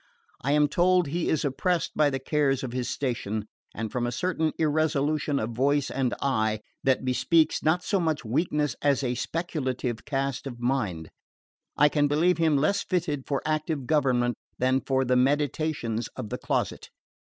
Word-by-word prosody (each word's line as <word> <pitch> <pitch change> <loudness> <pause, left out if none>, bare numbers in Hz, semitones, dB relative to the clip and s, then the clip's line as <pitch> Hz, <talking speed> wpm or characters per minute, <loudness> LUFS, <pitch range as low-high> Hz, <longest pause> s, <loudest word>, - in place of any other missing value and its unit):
I 140 +3 +1
am 150 0 +4
told 180 +4 +3
he 165 +4 -2
is 155 0 +1
oppressed 170 +5 0
by 150 -1 +4
the 135 - -2
cares 135 0 0
of 130 - -4
his 125 -1 -2
station; 110 -5 -2 0.3
and 110 -1 -4
from 120 -1 -1
a - - -2
certain 160 +2 0
irresolution 150 -1 +1
of 115 -2 -2
voice 140 +4 +1
and 130 -2 0
eye, 110 -5 +1 0.2
that 130 -1 +2
bespeaks 155 +5 +2
not 170 +3 +2
so 200 - +1
much 160 -6 -1
weakness 150 +4 0
as 140 -2 +2
a 125 -1 0
speculative 130 -6 -3
cast 135 -1 -2
of 120 -3 -7
mind, 110 -11 -1 0.7
I 150 - +6
can 145 0 +2
believe 165 +5 +2
him 160 -3 +3
less 175 +8 +2
fitted 160 -7 -2
for 140 -2 -1
active 155 -3 -1
government 125 -5 +2 0.2
than 130 +1 +2
for 135 -1 0
the 125 0 +2
meditations 135 -3 0
of 105 - -6
the - - -4
closet. - - -2
140 Hz, 170 wpm, -27 LUFS, 125-155 Hz, 0.7 s, I